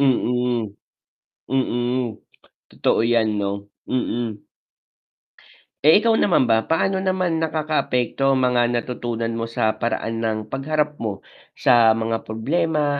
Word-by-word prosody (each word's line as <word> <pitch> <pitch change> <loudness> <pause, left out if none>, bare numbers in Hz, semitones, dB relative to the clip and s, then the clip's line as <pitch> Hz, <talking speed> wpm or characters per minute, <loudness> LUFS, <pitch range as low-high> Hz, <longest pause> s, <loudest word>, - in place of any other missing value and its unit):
Mm, 125 -5 +1 0.7
mm. 120 -3 -1 0.5
Totoo - - +1
yan 115 -2 +2
'no, 100 0 -3 0.2
mm. 120 -4 -2 1.4
Eh, 160 +8 +6
ikaw 230 - +4
naman 175 -8 +3
ba, 115 -2 +1
paano 190 +4 +1
naman 185 -3 0
nakakaapekto 145 -4 0
ang 130 - +1
mga 120 -1 +3
natutunan 120 -1 -3
mo 115 0 -3
sa 110 -1 0
paraan 115 -1 -2
ng 110 -1 -3
pagharap 150 +2 -1
mo 105 -4 -4 0.3
sa 120 -4 +5
mga 115 0 -1
problema 145 +5 0
120 Hz, 115 wpm, -22 LUFS, 115-150 Hz, 1.4 s, Eh